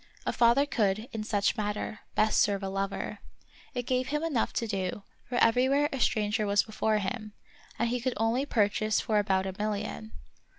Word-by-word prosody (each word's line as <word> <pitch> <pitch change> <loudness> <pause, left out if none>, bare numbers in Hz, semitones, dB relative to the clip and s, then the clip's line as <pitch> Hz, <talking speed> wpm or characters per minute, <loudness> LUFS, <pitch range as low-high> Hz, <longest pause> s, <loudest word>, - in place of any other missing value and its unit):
A - - 0
father 240 +4 +4
could, 215 -4 0
in 220 -1 -3
such 205 -1 +1
matter, 210 0 -3 0.2
best 215 0 +3
serve 200 -1 +1
a 195 - -2
lover. 195 0 -3 0.6
It 245 -1 -2
gave 255 0 0
him 300 +2 -1
enough 295 -9 0
to 230 - -1
do, 195 -2 -3 0.3
for 245 - -3
everywhere 260 +5 +3
a 270 - -3
stranger 215 -2 +1
was 200 0 +3
before 215 0 0
him, 210 +1 -4 0.4
and 235 - +1
he 245 0 -1
could 255 +1 -1
only 230 +5 +1
purchase 215 -2 +2
for 215 -2 +1
about 190 -2 +1
a 190 - -3
million. 215 +1 -3
215 Hz, 180 wpm, -29 LUFS, 205-245 Hz, 0.6 s, father